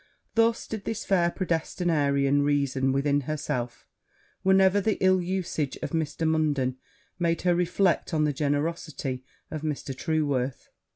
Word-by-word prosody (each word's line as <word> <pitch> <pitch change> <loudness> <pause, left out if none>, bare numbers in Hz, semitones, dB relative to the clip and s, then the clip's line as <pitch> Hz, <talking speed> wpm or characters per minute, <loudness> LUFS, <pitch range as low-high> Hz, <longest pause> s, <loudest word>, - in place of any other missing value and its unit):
Thus 230 0 +2
did 220 -2 -6
this 225 - -3
fair 175 -3 +3
predestinarian 150 -6 +1
reason 140 -2 +1
within 140 +1 +1
herself 130 -4 -3 0.6
whenever 190 +1 +4
the 215 +1 +1
ill 185 -1 +4
usage 175 -6 -2
of - - -3
Mr. 160 0 -1
Munden 145 -5 +1 0.4
made 170 -1 0
her 180 -1 +4
reflect 180 +1 +1
on 155 -2 +1
the 150 -1 +1
generosity 145 -2 -2 0.3
of 155 - -4
Mr. 150 -3 -3
Trueworth. 140 -4 -1
155 Hz, 130 wpm, -27 LUFS, 140-180 Hz, 0.6 s, whenever